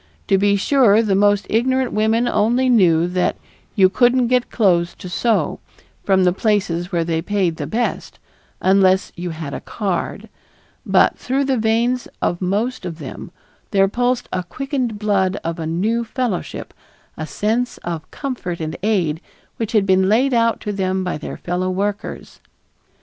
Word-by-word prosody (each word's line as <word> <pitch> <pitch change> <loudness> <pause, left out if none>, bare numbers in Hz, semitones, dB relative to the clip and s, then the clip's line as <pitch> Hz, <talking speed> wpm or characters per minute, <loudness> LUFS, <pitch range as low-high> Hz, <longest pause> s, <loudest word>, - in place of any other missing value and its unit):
To 195 -1 +4
be 200 0 +3
sure, 225 0 +4
the 205 -3 +1
most 205 +1 +3
ignorant 260 +3 +1
women 220 +3 +2
only 240 +4 +2
knew 175 -8 +4
that 180 0 0 0.4
"you 190 -2 +6
couldn't 245 +4 +3
get 250 -1 +1
clothes 175 -6 +2
to - - -9
sew" 215 +6 0 0.4
from 190 -1 +3
the 180 -1 +3
places 190 -4 0
where 170 -2 +1
they 165 -1 -1
paid 180 -3 0
the - - -4
best, 235 +2 -2 0.4
unless 190 0 +3
"you 175 0 -5
had 155 -3 -6
a - - -4
card," 195 -5 -3 0.6
but - - +3
through 270 +2 0
the 265 -1 +1
veins 235 +2 +1
of 175 - -1
most 205 +7 -1
of 175 -3 -5
them 145 -5 -8 0.4
there 195 -1 +3
pulsed 245 +4 0
the 185 - -1
quickened 255 - -3
blood 200 -2 +1
of 165 +1 -3
a 160 - -3
new 215 +9 0
fellowship, 235 -5 -4 0.4
a 155 - -5
sense 225 +8 -1
of 165 -2 -5
comfort 240 - -5
and 155 0 -4
aid 180 -7 0 0.4
which 225 -1 -3
had 210 -3 +3
been 190 0 +3
laid 255 +5 +3
out 230 -1 +2
to 210 - -3
them 190 -1 -1
by 180 - -2
their - - -6
fellow 180 +1 -2
workers. 200 +2 -4
200 Hz, 165 wpm, -20 LUFS, 180-235 Hz, 0.6 s, you